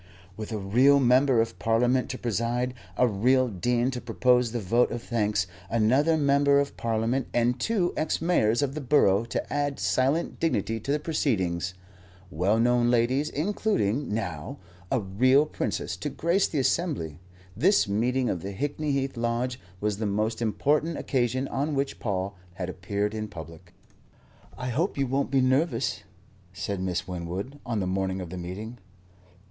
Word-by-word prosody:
With 110 +2 -7
a 110 - -2
real 125 +8 +4
Member 130 -1 +4
of 115 0 -4
Parliament 120 +3 +2
to 130 - -4
preside, 120 +2 -1 0.2
a 125 - +4
real 125 +5 +3
dean 120 +5 0
to 125 -2 -5
propose 125 0 +2
the 120 - -2
vote 115 +5 +2
of 120 - -5
thanks, 105 -5 0 0.2
another 130 +9 +3
Member 140 -1 +4
of 140 0 -2
Parliament 115 +3 -1
and 120 +1 +2
two 185 - 0
ex 155 - 0
mayors 145 -8 +2
of 135 -1 -1
the 155 - -4
borough 115 -7 +3
to 115 - -4
add 145 -1 -1
silent 135 +6 0
dignity 115 -8 0
to 135 - -3
the 145 - +2
proceedings, 95 - -1 0.6
well 95 +7 +1
known 120 0 +3
ladies, 125 +5 +2
including, 150 - -1
now, 90 -9 -4 0.3
a 130 - +2
real 130 +9 +3
Princess - - -3
to - - -3
grace 175 +4 +1
the 155 - -4
assembly, 135 - -1 0.4
this 180 - +3
meeting 120 +5 +1
of 90 - -2
the 100 +3 -5
Hickney 145 +5 -2
Heath 135 -1 -1
Lodge 120 +2 -1 0.2
was 105 0 -1
the 110 - -1
most 110 +3 -1
important 150 +8 +1
occasion 130 0 0
on 145 +2 -1
which 140 0 -2
Paul 100 -2 -2 0.2
had 90 0 -4
appeared 100 +3 -2
in 110 -1 -3
public. 85 -4 -11 0.9
"I 125 0 -4
hope 155 - -1
you 140 - +1
won't 135 +2 -1
be 135 -1 +3
nervous," 130 +6 +1 0.5
said 95 +1 -3
Miss 90 -2 -2
Winwood, 90 +10 -5
on 115 -3 -2
the 95 - -1
morning 95 0 -1
of 90 -2 -7
the 90 - -5
meeting. 105 +7 -7
120 Hz, 165 wpm, -27 LUFS, 105-140 Hz, 0.9 s, real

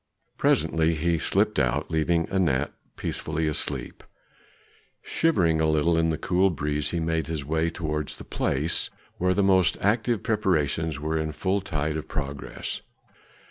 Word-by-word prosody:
Presently 80 +1 +3
he 85 +1 +1
slipped - - +2
out, - - 0
leaving 80 +1 +2
Anat 75 -7 +1 0.2
peacefully 80 +1 -2
asleep. 75 -1 -3 1.0
Shivering 85 - +2
a 80 - +3
little 80 +2 +3
in 80 0 +2
the 80 - 0
cool 90 +5 +2
breeze, 75 -3 -1
he 85 - -1
made 80 0 -1
his 80 -4 -3
way 80 +2 +1
towards 75 -3 -3
the - - -10
place 75 +5 -1 0.3
where 90 +1 +2
the 100 - +3
most 95 -2 +4
active 115 +2 +1
preparations 80 -7 0
were 80 +2 -1
in 80 -1 -2
full 95 +6 0
tide 80 -5 -2
of 80 - -6
progress. 70 -2 -4
80 Hz, 145 wpm, -26 LUFS, 75-90 Hz, 1.0 s, most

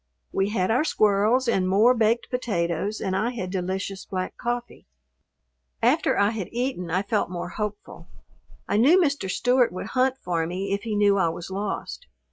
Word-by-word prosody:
We 195 +1 0
had 190 -2 0
our 250 +6 +3
squirrels 215 -1 +2
and 190 -5 +1
more 215 +6 +5
baked 230 0 +1
potatoes 200 -5 -1
and 190 -2 -1
I 215 +5 +1
had 200 -7 -5
delicious 190 +1 -3
black 185 -1 -4
coffee. 240 0 -4 0.9
After - - +2
I 200 +1 +3
had 210 -6 -5
eaten 240 -7 -2
I 185 +4 0
felt 205 -1 0
more 175 -1 -5
hopeful. 210 +2 -6 0.6
I 205 - +1
knew 290 - +6
Mr. 285 - 0
Stewart 245 +4 +2
would 185 +4 -6
hunt 260 0 +2
for 170 -8 -2
me 190 +3 -3
if 200 - -1
he 220 -1 -3
knew 205 -1 +3
I 170 -3 +3
was 170 +3 -7
lost. 205 - -4
205 Hz, 175 wpm, -25 LUFS, 185-240 Hz, 0.9 s, knew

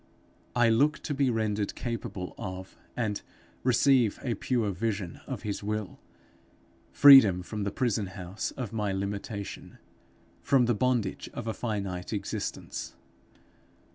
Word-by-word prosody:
I 120 -1 +5
look 145 +7 +3
to 150 - -2
be 135 -1 +2
rendered 110 -3 -1
capable 115 -6 -4
of 95 0 -7 0.2
and 110 -4 -1 0.4
receive 125 -3 +3
a 125 - 0
pure 115 -1 0
vision 100 -2 -3
of - - -5
his 105 -2 -3
will, 105 -1 -4 0.9
freedom 120 -11 +8
from 105 +2 -4
the 100 - -1
prison 110 -5 0
house 95 +1 -5
of 115 -4 -6
my 105 -3 -1
limitation, 100 +1 -5 0.6
from 130 -3 +3
the 120 - +2
bondage 115 -3 0
of 120 - -5
a 110 - -2
finite 100 -5 -3
existence. 100 -2 -4
110 Hz, 130 wpm, -29 LUFS, 100-120 Hz, 0.9 s, freedom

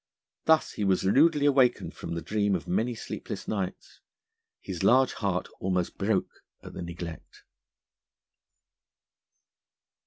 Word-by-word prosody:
Thus 160 -1 +4
he 105 - -4
was 95 -2 +2
rudely 145 - +4
awakened 135 -4 +3
from 85 - -6
the 85 - -4
dream 105 +2 +1
of 80 -5 -5
many 115 +7 0
sleepless - - -6
nights. 95 -3 -4 0.6
His 90 -4 -6
large 130 +5 +5
heart 95 -4 -1
almost 90 -2 -1
broke 100 0 -1 0.2
at - - -10
the - - -6
neglect. 85 -1 -8
100 Hz, 120 wpm, -28 LUFS, 90-125 Hz, 0.6 s, large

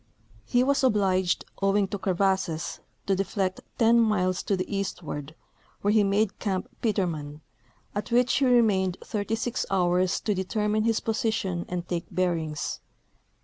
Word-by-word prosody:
He 245 0 +3
was 280 +1 +2
obliged, 190 -6 +2 0.2
owing 195 0 +3
to 205 - -4
crevasses, 190 -4 0 0.3
to 195 - +2
deflect 190 -1 -1 0.2
ten 230 0 +5
miles 185 -5 +2
to 200 - 0
the 185 +2 -3
eastward, 160 -6 -4 0.5
where 205 - +2
he 215 -1 +4
made 200 +1 +1
camp 190 -3 -2
Petermann, 160 -9 -1 0.5
at 205 0 -3
which 245 +1 +3
he 275 - +3
remained 210 -7 +3
36 225 +3 -2
hours 180 -1 +2
to 210 - 0
determine 210 +3 0
his 225 -1 +2
position 220 -6 -1
and 175 -1 -4
take 170 -2 -2
bearings. 170 -4 -1
195 Hz, 140 wpm, -27 LUFS, 180-215 Hz, 0.5 s, ten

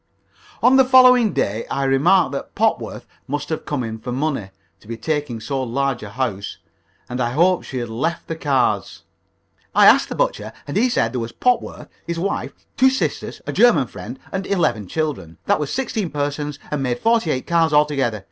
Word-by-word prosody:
On 260 +2 +6
the 265 - +7
following 255 -3 +6
day 110 +3 -2
I 140 - -1
remarked 135 +4 +3
that 140 - -6
Popworth - - -1 0.2
must 145 +2 -3
have 160 - -3
come 145 -4 -2
in 110 -1 -5
for 125 +2 -6
money, 135 -6 -2 0.3
to - - -21
be 115 0 -5
taking 145 -2 -2
so 135 +4 -3
large 130 +1 -1
a 105 - -7
house, 100 -4 -3 0.5
and 125 +1 -4
I 120 0 -1
hoped 180 +5 +2
she 130 - -5
had 120 -1 -3
left 130 +10 -2
the 165 - -4
cards. 130 -10 0 0.7
"I - - +6
asked - - +6
the - - -4
butcher, 110 +1 -1
and 145 - -5
he 240 +5 +3
said 240 - 0
there 125 - -1
was 115 0 -4
Popworth, 250 - -1 0.2
his 170 0 -3
wife, 195 +4 -2 0.2
two 265 - +6
sisters, 265 +1 -3
a - - -4
German 240 - +4
friend, 110 +3 -9
and 195 0 -3
eleven 120 - 0
children. 140 - -3
That - - +2
was 150 -2 -3
sixteen 225 -8 -2
persons, 145 0 -3
and 150 -2 -1
made 125 -2 -1
forty 225 - +1
eight 130 -3 -1
cards 165 -2 +2
altogether. 145 -7 +2
145 Hz, 195 wpm, -21 LUFS, 120-170 Hz, 0.7 s, the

